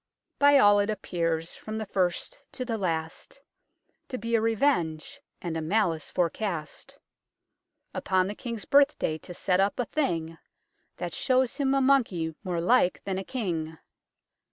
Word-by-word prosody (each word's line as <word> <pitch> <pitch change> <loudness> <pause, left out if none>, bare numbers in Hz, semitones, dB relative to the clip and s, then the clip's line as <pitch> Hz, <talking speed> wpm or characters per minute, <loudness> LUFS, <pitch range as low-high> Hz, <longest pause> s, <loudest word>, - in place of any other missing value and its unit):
By 285 0 +7
all 205 -5 +6
it 205 +1 +1
appears, 165 -5 -2
from 215 0 -6
the 220 - -3
first 190 - -1
to 255 - -4
the 235 -2 -2
last, 165 - -3 0.7
To 255 - -4
be 230 +1 -4
a 225 - +4
Revenge, 220 - 0 0.2
and 170 -2 -3
a 160 - -2
Malice 165 -3 0
forecast, 170 -3 -3 1.0
Upon 185 -1 +1
the 200 - -3
King's 230 -1 -6
Birth 285 +1 +4
day 155 0 -2
to 180 - -10
set 180 +1 +1
up 195 +3 +1
a 245 - +1
thing 165 - -2 0.6
That 175 -2 -4
shows 255 - +1
him 275 -2 +1
a 275 - +3
Monkey 225 -12 +2
more 180 -3 -2
like 185 +1 +2
than 190 -1 -2
a - - -4
King. 165 -10 -3
195 Hz, 155 wpm, -27 LUFS, 165-240 Hz, 1.0 s, By